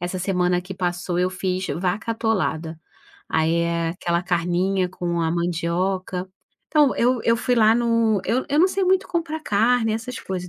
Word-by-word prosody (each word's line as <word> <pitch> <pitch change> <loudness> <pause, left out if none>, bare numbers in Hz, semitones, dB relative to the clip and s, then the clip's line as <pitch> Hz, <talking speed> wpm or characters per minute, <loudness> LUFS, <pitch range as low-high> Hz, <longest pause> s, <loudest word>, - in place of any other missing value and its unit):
essa 175 +1 -3
semana 180 -1 +1
que 185 +1 -8
passou 180 -1 -2
eu 180 0 +1
fiz 185 0 -2
"vaca 185 +6 -2
atolada". 175 -8 -1 0.5
Aí 160 +1 +1
é 170 0 0
aquela 170 0 -1
carninha 180 +2 0
com 175 -2 -3
a 165 -1 0
mandioca. 180 +2 -2 0.4
Então 295 -3 +3
eu 245 0 +2
eu 230 - +3
fui 250 +2 +1
lá 220 -1 +5
no 230 -3 +2
eu 250 +3 0
eu 290 - +2
não 365 +4 +5
sei 385 0 0
muito 380 +1 +2
comprar 325 -2 -2
carne 225 -1 +2
essas 225 +3 -4
coisas, 180 -1 -5
185 Hz, 170 wpm, -22 LUFS, 175-230 Hz, 0.5 s, lá